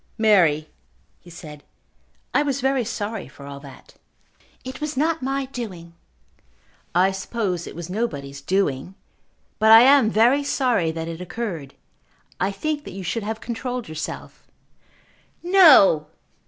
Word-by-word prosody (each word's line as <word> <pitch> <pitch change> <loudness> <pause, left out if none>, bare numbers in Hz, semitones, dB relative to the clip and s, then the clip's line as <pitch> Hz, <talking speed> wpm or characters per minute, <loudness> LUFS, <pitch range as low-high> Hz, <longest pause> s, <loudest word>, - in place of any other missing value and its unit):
"Mary," 175 -9 +3 0.5
he 175 - -17
said, 155 -4 -11 0.7
"I - - +3
was 280 -2 -1
very 265 -1 +1
sorry 215 -2 -5
for 140 - -14
all 140 0 -8
that." 140 -2 -15 0.7
"It 260 +2 -8
was 300 -2 -4
not 320 +2 0
my 270 +1 -2
doing." 195 -10 -8 1.0
"I 185 +2 +4
suppose 190 -3 -3
it - - -9
was 170 0 -7
nobody's 145 -10 -4
doing. 180 -1 -1 0.6
But 220 0 +5
I 225 +1 +10
am 265 -3 +6
very 240 +7 +3
sorry 250 - 0
that 160 0 -5
it 165 +1 -7
occurred. 180 -7 -6 0.6
I 190 - +1
think 295 +9 -3
that 195 - -9
you 195 - -6
should 225 +6 -2
have 220 +2 -5
controlled 245 +1 -5
yourself." 155 0 -7 1.0
"No!" 305 - +6
210 Hz, 140 wpm, -22 LUFS, 165-255 Hz, 1.0 s, I